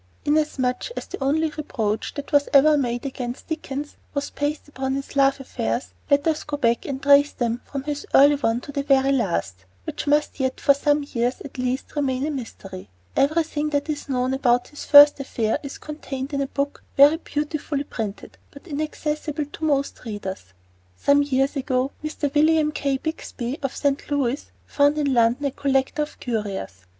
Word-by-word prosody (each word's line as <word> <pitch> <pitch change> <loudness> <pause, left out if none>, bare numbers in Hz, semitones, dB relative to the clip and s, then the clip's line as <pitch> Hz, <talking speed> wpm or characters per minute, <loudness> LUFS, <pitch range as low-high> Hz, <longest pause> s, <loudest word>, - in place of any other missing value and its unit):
Inasmuch 290 - 0
as - - -4
the - - -6
only 310 +3 +1
reproach 225 -9 -3
that 285 - -6
was 285 -1 +3
ever 300 +2 +7
made 245 -2 -1
against 250 -2 -5
Dickens 295 -2 -5 0.2
was 280 0 -2
based 290 +1 -3
upon 265 -2 -3
his 275 +1 -6
love 275 0 +3
affairs, 115 - -3 0.2
let 285 0 +3
us 315 -1 0
go 295 -1 -4
back 235 -3 +1
and 270 -2 -3
trace 285 +1 +6
them 235 0 -1
from 275 -2 -5
this 290 0 -3
early 285 +2 +8
one 240 -4 0
to 285 - -9
the 280 - -1
very 275 -1 +3
last, 190 - 0 0.3
which 290 - -5
must 295 0 +1
yet 260 -1 -1
for 280 - +5
some 290 +1 +1
years, 245 +1 0
at 270 -2 -9
least, 255 +3 -2
remain 270 -2 0
a 310 - -1
mystery. 200 - -8 0.3
Everything 305 0 +1
that 290 +1 -1
is 290 -1 -6
known 255 0 0
about 245 -2 +2
his 295 - -9
first 290 0 +9
affair 230 -5 -1
is 280 -2 -7
contained 285 -2 -6
in 280 - 0
a 275 - -1
book 280 +1 -3 0.2
very 290 +3 +7
beautifully 295 -2 -3
printed, 220 -7 -6
but 280 - -15
inaccessible 300 -1 -3
to 295 +2 -11
most 280 -2 0
readers. 205 - -6 0.5
Some 285 - +4
years 270 0 +1
ago 265 -1 0
Mr. 300 -2 -3
William 310 0 +4
K. 280 -2 -1
Bixby, 275 -3 -5
of 275 -2 -3
St. 285 -1 -1
Louis, 280 -2 -1 0.2
found 290 +1 +2
in 285 -3 +1
London 240 +4 +3
a 280 - +1
collector 270 +1 0
of 295 - -5
curios. 195 - -4
280 Hz, 180 wpm, -23 LUFS, 255-295 Hz, 0.5 s, first